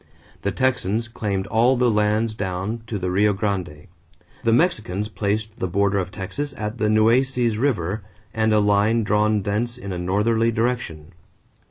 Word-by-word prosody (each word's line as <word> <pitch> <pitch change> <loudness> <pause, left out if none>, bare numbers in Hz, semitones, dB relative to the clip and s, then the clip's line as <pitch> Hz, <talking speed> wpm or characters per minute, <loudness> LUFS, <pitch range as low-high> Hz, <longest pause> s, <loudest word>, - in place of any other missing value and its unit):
The - - 0
Texans 120 -3 0
claimed 100 -5 -3
all 120 +5 +3
the 125 -1 +3
lands 105 +1 +1
down 95 +3 -3
to 110 - -3
the 90 -1 -2
Rio 105 +3 +3
Grande. 95 -6 -3 0.6
The 115 - +2
Mexicans 110 - +1
placed 105 +1 -2
the 95 - -1
border 100 +2 +1
of 90 - -3
Texas 115 +10 -5
at 105 +2 -4
the 110 - +2
Nueces 115 +1 +2
River 110 -7 0 0.3
and 110 0 +1
a 110 - +4
line 105 +2 +3
drawn 105 0 +2
thence 115 +4 -2
in 100 -5 -6
a 90 - -4
northerly 110 +6 +1
direction. 110 -9 -2
105 Hz, 160 wpm, -22 LUFS, 100-115 Hz, 0.6 s, a